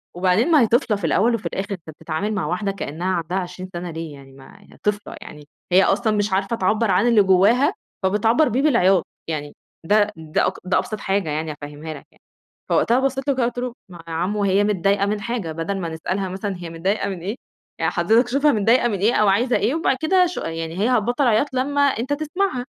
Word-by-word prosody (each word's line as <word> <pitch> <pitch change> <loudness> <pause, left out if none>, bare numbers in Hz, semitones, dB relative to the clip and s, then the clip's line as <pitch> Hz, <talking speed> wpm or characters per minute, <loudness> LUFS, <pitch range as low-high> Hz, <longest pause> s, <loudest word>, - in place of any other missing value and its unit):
وبعدين 185 - +2
ما 305 - +6
هي 230 - +4
طفلة 230 -3 +2
في 200 - -12
الأول 230 +8 +2
وفي 225 - -7
الآخر، 195 +2 -4
أنت 165 -4 -9
بتتعامل 165 +7 -4
مع 195 -7 -2
واحدة 190 +5 -1
كإنها 175 -2 -5
عندها 175 +2 -2
20 185 0 -5
سنة 175 0 -5
ليه 160 -1 -6
يعني 135 -1 -14
ما 135 +9 -16 0.2
طفلة، 205 0 -2
يعني 150 -1 -11 0.2
هي 185 +2 +6
أصلًا 220 +3 +1
مش 205 -1 0
عارفة 195 +4 0
تعبّر 215 +1 +1
عن 230 - +3
اللي 230 -3 +5
جواها 220 - +4 0.3
فبتعبّر 225 +9 +3
بيه 250 +4 0
بالعياط، 195 - +3 0.2
يعني 150 -2 -4 0.3
ده 210 +3 +3
ده 155 -1 0
اك - - -1
ده 185 - +2
أبسط 215 -3 -3
حاجة 195 -4 -1
يعني 155 +1 -2
أفهمها 150 +2 -8
لك 145 - -12
يعني، - - -30 0.5
فوقتها 240 +2 +3
بصّيت 270 0 -1
له 280 - +3
كده 255 - 0
وقُلت 240 +1 -2
له: 245 -1 -3 0.2
"ما 175 -2 -12
يا 165 - -6
عمُه 200 +5 -1
هي 195 +1 +3
متضايقة 200 0 +1
من 205 0 -2
حاجة 200 -6 -3
بدل 165 +5 -3
ما 170 -3 -3
نسألها 185 +4 -3
مثلًا 195 +1 -4
هي 175 -1 -7
متضايقة 190 +6 -1
من 190 - -5
إيه، 200 +6 -3 0.4
يعني - - +1
حضرتك 230 +3 +3
شوفها 280 +4 +3
متضايقة 230 +3 +3
من 205 -4 -2
إيه 215 +5 +3
أو 210 - +3
عايزة 235 +6 +2
إيه 240 +8 0
وبعد 320 -5 +1
كده 365 +3 +4
شو 350 - -5
يعني 165 +1 -5
هي 215 +5 +2
هتبطّل 245 +3 +1
عياط 240 +5 +2
لمّا 285 +3 0
أنت 275 -1 +1
تسمعها" 300 -3 -2
200 Hz, 220 wpm, -21 LUFS, 175-240 Hz, 0.5 s, ما